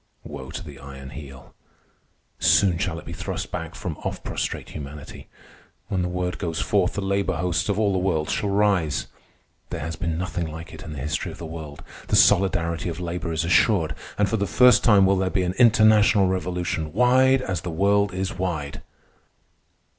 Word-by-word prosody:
Woe 70 -4 -8
to - - -6
the 70 -2 -11
Iron 70 -1 -10
Heel! 70 -2 -11 0.9
Soon 95 -4 +4
shall - - -2
it - - -10
be - - -7
thrust - - -5
back - - -5
from - - -5
off - - -5
prostrate - - -4
humanity. 70 -1 -9 0.6
When 95 -2 0
the 90 - -1
word 90 -2 -3
goes 80 -2 -3
forth, 100 -4 +1
the 100 - -2
labor 100 -1 0
hosts 90 +4 -1
of 100 - 0
all 105 -2 +2
the 95 - +1
world 85 -5 0
shall 100 - -1
rise. 95 -9 +1 0.6
There - - -4
has 80 +2 -4
been 85 -3 -2
nothing 90 -1 -3
like 80 +2 -9
it - - -10
in 80 - -8
the - - -8
history 75 +4 -3
of - - -11
the 85 - -7
world. 80 -3 -8 0.2
The - - +1
solidarity 85 -3 +3
of 85 - -5
labor 85 -1 -4
is 80 0 -1
assured, 85 0 +3 0.2
and 105 - +2
for 110 - 0
the 100 -1 -1
first 125 +9 +5
time 100 -4 +6
will 95 0 +3
there 95 0 0
be 95 0 0
an 90 0 -1
international 110 -3 +5
revolution 90 -4 -2
wide 130 +3 +4
as 90 -7 -3
the 90 - -5
world 100 +4 +2
is 95 +1 -3
wide. 80 -6 -4
90 Hz, 190 wpm, -24 LUFS, 80-100 Hz, 0.9 s, time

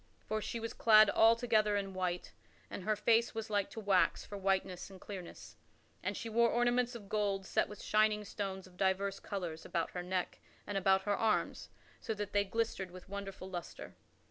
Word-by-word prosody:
For 215 0 -2
she 230 - -4
was 230 0 -4
clad 215 -2 +6
altogether 225 -2 +4
in 195 -1 -3
white 180 -1 -2 0.4
and 185 - -6
her 215 - +2
face 230 +3 +2
was 225 -1 -4
like 205 -1 +1
to - - -7
wax 200 -3 +2
for 205 - -8
whiteness 190 -2 -1
and 190 -1 -12
clearness, 185 -4 -9 0.4
and - - -2
she 230 - -5
wore 235 +1 +3
ornaments 240 +1 +2
of 210 -4 -9
gold 200 -2 0
set - - +1
with 210 - -9
shining 215 0 +2
stones 195 -2 -4
of 180 -1 -17
divers 195 +1 0
colors 175 -5 -5
about 170 -1 -2
her 180 - -4
neck 180 0 -2 0.3
and 205 - -5
about 190 0 +3
her 205 0 +1
arms 220 0 0 0.3
so 220 - -3
that 205 -1 -5
they 205 0 +4
glistered 205 -2 -2
with 185 +1 -12
a - - -17
wonderful 195 -2 -6
lustre. 175 -3 -7
200 Hz, 195 wpm, -34 LUFS, 190-215 Hz, 0.4 s, clad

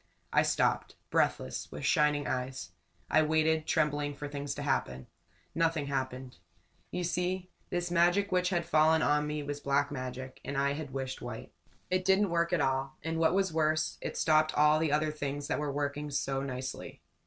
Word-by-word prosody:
I - - +6
stopped, - - +1 0.2
breathless, 65 - 0
with - - -5
shining 150 -1 +3
eyes. 125 -9 -3 0.4
I 155 - +4
waited, 155 0 +2
trembling, 145 -2 +1
for 145 +1 -6
things 145 -1 -4
to 145 - -5
happen. 65 - -1 0.5
Nothing 165 -3 +1
happened. 130 -4 -4 0.5
You 180 - -3
see, 180 +1 -2 0.2
this 175 -1 -2
magic 175 +4 +3
which 180 0 +2
had 175 -2 0
fallen 160 +1 +4
on 150 0 +2
me 150 0 -3
was 145 0 -4
black 140 0 +1
magic 130 -1 -6
and 140 +1 -4
I 140 0 +2
had 150 -1 -5
wished 130 0 -4
white. - - -7 0.4
It 185 0 +2
didn't 195 0 +3
work 170 0 +1
at 175 -4 +2
all, 135 0 -1
and, 165 +1 -2
what 165 +2 +3
was 195 -3 +1
worse, 155 0 +1
it - - -4
stopped 155 0 +3
all 150 +1 +5
the 160 -2 +1
other 150 +1 +2
things 145 -1 -4
that - - 0
were 150 -1 -1
working 145 +1 -2
so 135 -1 -1
nicely. 130 -1 -6
150 Hz, 180 wpm, -31 LUFS, 140-160 Hz, 0.5 s, I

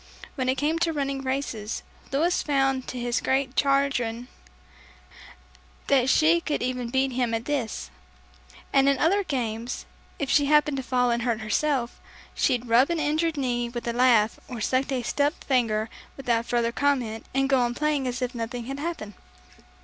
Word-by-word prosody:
When 255 -2 -1
it 260 - +1
came 310 +4 0
to 330 -1 +1
running 275 -2 -2
races, 260 -5 -3 0.3
Louis 325 +6 +2
found 270 -3 +1
to 255 - -5
his 240 0 -1
great 265 -1 0
chagrin, 265 -4 +1 1.6
that 265 -2 +3
she 325 +4 +4
could 300 -6 -2
even 250 -1 -2
beat 265 +1 +1
him 245 -2 0
at 225 - -4
this; 275 -7 -3 0.8
and 275 0 +5
in 280 - +3
the - - -6
other 395 +5 +3
games 240 - -3 0.3
if 285 - -2
she 285 +1 +3
happened 300 -1 +3
to - - -1
fall 250 -1 +1
and 235 0 0
hurt 230 -2 -1
herself, 245 +3 -1 0.3
she'd 245 -1 +1
rub 240 +5 +4
an 340 -1 0
injured 310 +2 0
knee 240 -3 -1
with 240 0 -6
a 235 - 0
laugh 235 -3 +3
or 245 -3 -6
sucked 260 +5 0
a 255 -2 -1
stubbed 285 +6 0
finger 225 -5 +1 0.3
without 235 -3 0
further 235 -1 +1
comment, 245 -5 -1
and 270 0 +2
go 270 -1 +3
on 240 -1 0
playing 300 -2 0
as 250 +1 -2
if 250 +1 -2
nothing 235 0 -4
had 275 +3 -5
happened. 295 -10 -4
260 Hz, 175 wpm, -26 LUFS, 240-280 Hz, 1.6 s, and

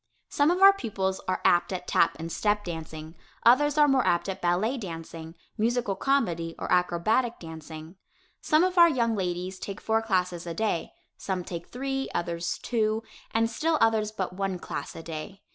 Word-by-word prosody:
Some 290 +2 +2
of 360 +2 +2
our 395 0 +10
pupils 195 - -3
are 185 0 -1
apt 175 +2 +4
at 180 -1 -4
tap 170 - +3
and 165 +1 -6
step 210 +2 0
dancing, 160 -2 -7 0.3
others 290 +5 +5
are 295 -1 +6
more 270 -2 +3
apt 175 +2 +1
at 190 - -5
ballet 180 +8 +1
dancing, 165 -6 -7 0.2
musical 235 -2 0
comedy 170 -13 0
or - - -5
acrobatic 180 +7 +1
dancing. 160 +1 -10 0.4
Some 310 +2 +3
of 370 -1 +1
our 340 0 +9
young 235 -6 +1
ladies 185 0 -3
take 200 +1 -6
four 220 0 +1
classes 180 -5 -1
a 165 - -4
day; 210 -4 -1 0.3
some 185 -2 -3
take 170 -1 -7
three; 270 +1 -3
others 170 0 -2
two; 220 -2 0 0.3
and 225 0 +1
still 310 +8 0
others 220 -1 +2
but 190 -4 -4
one 195 0 -2
class - - -6
a 165 - -8
day. 165 +5 -7
195 Hz, 180 wpm, -27 LUFS, 170-235 Hz, 0.4 s, our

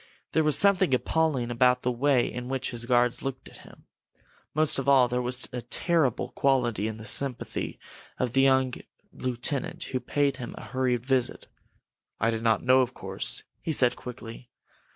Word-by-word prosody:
There 160 - +2
was 150 -2 +3
something 190 -8 +4
appalling 135 -4 0
about 125 +1 +3
the 125 - +1
way 130 0 +2
in 125 0 -6
which 130 -1 -2
his 120 -1 -4
guards 125 -1 +2
looked 135 -1 -5
at - - -13
him. - - -17 0.7
Most 155 -2 +2
of 135 +1 -1
all, 130 -3 +6
there 125 +1 -1
was 125 +1 -1
a 125 - -3
terrible 155 -4 0
quality 120 -6 0
in 110 -1 -5
the 110 - -10
sympathy 135 +2 0 0.4
of 125 -2 -2
the 135 - +4
young 130 -1 +3 0.4
lieutenant 130 +2 -2
who 130 - -3
paid 140 0 0
him 125 -2 -7
a - - -8
hurried 125 -2 -1
visit. 130 -2 0 0.7
"I 115 +2 +2
did 110 -1 -3
not 115 -2 +1
know, 130 +1 +5
of 125 0 -2
course," - - -1 0.2
he 160 - -3
said, 125 -5 +2
quickly. 120 -1 -10
125 Hz, 175 wpm, -27 LUFS, 120-135 Hz, 0.7 s, all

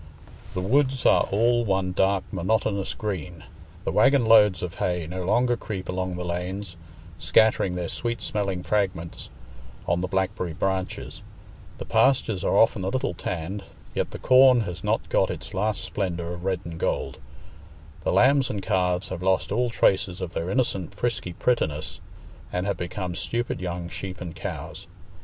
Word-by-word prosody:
The 90 - -1
woods 130 +5 +1
are - - +5
all 120 +4 +2
one 95 -3 0
dark 95 +1 +2
monotonous 100 +1 0
green; 90 -5 -5 0.4
the - - -1
waggon 135 -3 +4
loads 105 -4 +6
of 90 -2 -5
hay 90 -2 0
no 90 +3 -5
longer 120 +5 +3
creep 95 -5 -6
along 90 0 -2
the 90 0 -4
lanes, 90 +2 -4 0.4
scattering 90 +2 +3
their 90 -1 -2
sweet 120 +7 -3
smelling 100 -4 -2
fragments 95 -5 -2 0.6
on 85 +1 +1
the 90 - -1
blackberry 95 -2 -1
branches; 95 +2 -3 0.6
the - - -6
pastures 115 -8 +2
are - - +2
often 110 -3 +4
a 95 - 0
little 130 -3 -1
tanned, 95 +3 -4 0.3
yet - - -1
the - - -7
corn 130 -1 +6
has 90 -5 -5
not - - 0
got - - +2
its - - -6
last 105 +3 -1
splendour 85 -3 -3
of 85 +1 -8
red 95 -2 0
and 85 -1 -7
gold; - - -2 0.8
the - - +1
lambs 135 0 +4
and 100 -6 -3
calves 90 -1 0
have 95 -2 -5
lost 95 +1 +1
all 120 +4 +1
traces 95 -4 +2
of 90 -2 -5
their 85 +2 -2
innocent 100 -7 -1
frisky 110 -5 -2
prettiness, 80 -10 -1 0.5
and 90 +1 -1
have 100 -2 -1
become 90 +1 -4
stupid 120 +5 -2
young 90 -1 -4
sheep 95 +1 -6
and 85 -2 -7
cows. - - -6
95 Hz, 165 wpm, -25 LUFS, 90-110 Hz, 0.8 s, loads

